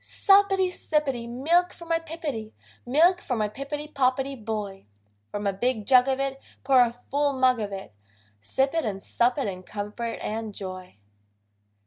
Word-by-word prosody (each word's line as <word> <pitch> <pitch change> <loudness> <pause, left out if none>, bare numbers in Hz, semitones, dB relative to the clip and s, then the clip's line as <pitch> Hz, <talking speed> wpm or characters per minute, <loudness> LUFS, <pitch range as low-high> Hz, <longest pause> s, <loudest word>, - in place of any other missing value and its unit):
Suppity, 390 -1 +4
sippity! 275 -9 -1
Milk 335 +9 +2
for 340 - -12
my 330 0 +1
Pippity, 300 -10 -5 0.3
Milk 340 +8 +4
for 250 - -2
my 215 -2 0
Pippity 280 +6 -5
Poppity 270 -1 0
Boy: 210 - -5 0.4
From 205 0 -4
a 200 - +1
big 220 +1 -1
jug 255 +1 +6
of 265 0 0
it 275 0 -2 0.2
Pour 265 -1 +5
a 240 0 +1
full 285 0 +2
mug 255 -2 +3
of 205 -2 -3
it, 195 - -7 0.5
Sip 265 - 0
it 330 - +1
and 195 -4 -4
sup 245 +3 +1
it 275 - -1
in 185 -2 -5
comfort 210 +4 -5
and 215 -1 -4
joy. 185 - -7
255 Hz, 165 wpm, -26 LUFS, 215-290 Hz, 0.5 s, jug